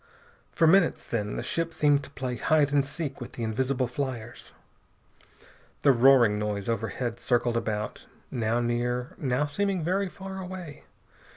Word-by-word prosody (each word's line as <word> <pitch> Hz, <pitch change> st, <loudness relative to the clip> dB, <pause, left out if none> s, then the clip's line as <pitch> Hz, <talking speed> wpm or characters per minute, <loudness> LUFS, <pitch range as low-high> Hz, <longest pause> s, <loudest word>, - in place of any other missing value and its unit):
For 165 Hz, -, +2 dB
minutes, 175 Hz, +2 st, +4 dB
then, 105 Hz, -3 st, -2 dB
the -, -, -3 dB
ship 165 Hz, 0 st, -1 dB
seemed 145 Hz, -1 st, +3 dB
to -, -, -8 dB
play 130 Hz, -3 st, -4 dB
hide 145 Hz, +3 st, +2 dB
and 140 Hz, -1 st, +4 dB
seek 145 Hz, -1 st, -5 dB
with 120 Hz, -, -7 dB
the 120 Hz, -, -5 dB
invisible 130 Hz, +4 st, 0 dB
fliers. 120 Hz, -2 st, -5 dB, 1.3 s
The 140 Hz, -, +6 dB
roaring 120 Hz, -4 st, +5 dB
noise 105 Hz, -2 st, -2 dB
overhead 115 Hz, +1 st, -2 dB
circled 120 Hz, -1 st, +1 dB
about, 105 Hz, -2 st, -3 dB, 0.2 s
now 115 Hz, 0 st, 0 dB
near, 120 Hz, +1 st, -1 dB
now 130 Hz, +1 st, +1 dB
seeming 190 Hz, +4 st, -1 dB
very 190 Hz, +3 st, 0 dB
far 190 Hz, +1 st, -7 dB
away. 180 Hz, -5 st, -8 dB
130 Hz, 150 wpm, -27 LUFS, 115-150 Hz, 1.3 s, The